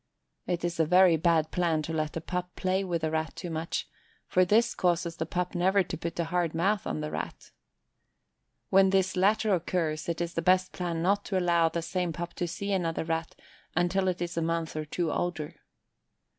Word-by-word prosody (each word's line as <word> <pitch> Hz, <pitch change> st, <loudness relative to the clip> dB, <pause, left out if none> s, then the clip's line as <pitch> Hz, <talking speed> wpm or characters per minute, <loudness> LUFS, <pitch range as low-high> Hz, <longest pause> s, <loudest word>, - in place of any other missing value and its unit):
It 175 Hz, -1 st, -1 dB
is 175 Hz, -1 st, -3 dB
a 160 Hz, -, +4 dB
very 180 Hz, 0 st, +6 dB
bad 160 Hz, -1 st, +2 dB
plan 165 Hz, -4 st, +1 dB
to 160 Hz, -, -4 dB
let 155 Hz, 0 st, -2 dB
a -, -, -3 dB
pup 180 Hz, +1 st, -4 dB
play 190 Hz, +1 st, 0 dB
with 170 Hz, -4 st, -2 dB
a 160 Hz, -, 0 dB
Rat 160 Hz, 0 st, -2 dB
too 175 Hz, -3 st, -6 dB
much, 160 Hz, +1 st, -3 dB, 0.4 s
for 185 Hz, -, +3 dB
this 220 Hz, +6 st, +3 dB
causes 170 Hz, -2 st, 0 dB
the 160 Hz, -, -3 dB
pup 180 Hz, +1 st, -2 dB
never 190 Hz, +2 st, +3 dB
to 180 Hz, -, -5 dB
put 170 Hz, +1 st, -5 dB
a -, -, +3 dB
hard 170 Hz, -1 st, -1 dB
mouth 195 Hz, +4 st, +1 dB
on 75 Hz, -3 st, -2 dB
the 75 Hz, 0 st, -4 dB
Rat. 80 Hz, 0 st, -6 dB, 1.2 s
When 190 Hz, 0 st, +6 dB
this 190 Hz, -1 st, +2 dB
latter 205 Hz, +3 st, +3 dB
occurs 165 Hz, -3 st, -1 dB
it 170 Hz, -, -2 dB
is 170 Hz, 0 st, -2 dB
the 165 Hz, -, -1 dB
best 185 Hz, +2 st, +3 dB
plan 170 Hz, -2 st, -3 dB
not 200 Hz, +3 st, +2 dB
to 195 Hz, -, -1 dB
allow 170 Hz, -2 st, +3 dB
the 165 Hz, 0 st, -3 dB
same 180 Hz, -1 st, -2 dB
pup 170 Hz, +2 st, -5 dB
to 175 Hz, -, -1 dB
see 200 Hz, +4 st, -4 dB
another 170 Hz, -5 st, 0 dB
Rat 165 Hz, 0 st, -3 dB, 0.4 s
until 180 Hz, +2 st, +1 dB
it 175 Hz, -1 st, 0 dB
is 170 Hz, -1 st, -5 dB
a -, -, +2 dB
month 165 Hz, -1 st, -1 dB
or 155 Hz, 0 st, -3 dB
two 160 Hz, +1 st, -2 dB
older. 165 Hz, -4 st, -3 dB
175 Hz, 210 wpm, -29 LUFS, 165-185 Hz, 1.2 s, very